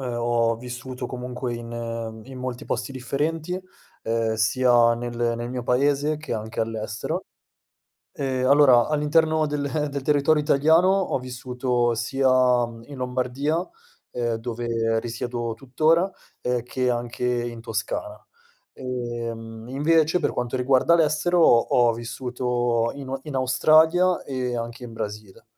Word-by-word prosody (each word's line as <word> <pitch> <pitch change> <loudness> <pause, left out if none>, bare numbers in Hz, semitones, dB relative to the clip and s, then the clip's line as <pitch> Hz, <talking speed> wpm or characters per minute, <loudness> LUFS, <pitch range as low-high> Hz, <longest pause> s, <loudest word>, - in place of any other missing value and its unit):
ehm, 125 -2 -3
ho 115 -1 +1
vissuto 125 +1 -6
comunque 125 0 -5
in 115 -1 -5
in 130 -1 -9
molti 125 -1 -5
posti 125 +3 -3
differenti, 155 +7 -2 0.4
ehm, 115 0 0
sia 120 +1 +4
nel 120 0 -2
nel 120 +1 -5
mio 125 -1 -4
paese 145 +4 +2
che 155 +1 -6
anche 110 +1 -4
all'estero. 110 -1 -3 0.9
Ehm, 130 -2 -1
allora 135 -4 +6
all'interno 155 +1 +2
del 145 -1 -2 0.2
del 140 0 -3
territorio 150 +2 +3
italiano 160 +4 +4
ho 195 -7 +1
vissuto 125 -1 -1
sia, 130 +4 0 0.4
mhmm, 115 -1 -11
in 145 - -9
Lombardia, 125 +4 -1 0.5
ehm, 120 -2 -2
dove 115 -1 -1
risiedo 120 0 -4
tuttora, 155 +7 +2 0.3
ehm, 125 -1 -1
che 125 +1 -1
anche 120 0 -3
in 120 -1 -1
Toscana; 115 - -4 0.5
ehm 115 -3 -5
invece 155 +4 +3
per 155 - 0
quanto 125 +1 -2
riguarda 130 +6 +4
l'estero 160 +2 +2
ho 120 -8 +7 0.3
ho - - +1
vissuto 120 0 -1
in 140 -2 -8
o 135 0 -3
in 150 -3 -5
Australia 160 +7 +4
e 125 -3 -3
anche 120 +1 -6
in 115 - -10
Brasile. 105 -2 -7
125 Hz, 135 wpm, -24 LUFS, 120-140 Hz, 0.9 s, ho